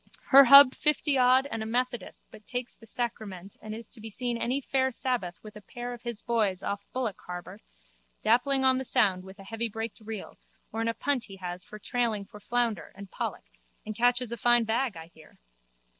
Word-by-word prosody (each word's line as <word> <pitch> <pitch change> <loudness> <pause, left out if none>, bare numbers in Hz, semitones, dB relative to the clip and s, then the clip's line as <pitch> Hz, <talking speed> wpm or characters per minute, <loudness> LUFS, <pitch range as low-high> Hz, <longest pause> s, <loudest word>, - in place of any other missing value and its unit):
Her 275 0 +9
hub 275 0 +10
fifty 300 -1 +1
odd 255 +1 +4
and 225 - -3
a - - -3
methodist 240 -2 -3
but 210 - -15
takes 245 -1 -5
the 225 - -17
sacrament 205 -6 -4
and 215 0 -7
is 230 +1 -8
to 225 - -13
be 225 - -7
seen 240 +3 -2
any 245 +3 -1
fair 265 -1 0
sabbath 245 -8 -2
with 215 -1 -11
a 210 - -10
pair 245 +4 -7
of 240 - -10
his 235 -3 -4
boys 215 -6 0
off 200 0 -3
Bullock 240 -6 -3
harbour 180 0 -7 0.6
dapping 265 +4 +2
on 260 0 +5
the - - -3
sound 205 -8 +2
with 190 +1 -12
a 195 - -12
heavybraked 225 +1 -4
reel 215 -2 -8 0.3
or 225 - -2
in 225 - -1
a 230 - -1
punt 275 0 -1
he 195 - -11
has 180 -1 -7 0.2
trailing 230 -5 -1
for 210 +1 -13
flounder 225 -5 -1
and 195 -1 -11
pollock - - -5 0.4
and 215 - -5
catches 245 +1 +1
a 235 - -4
fine 240 +1 +4
bag, 225 -2 -1
I 160 - -9
hear. 155 - -18
230 Hz, 205 wpm, -28 LUFS, 205-250 Hz, 0.6 s, hub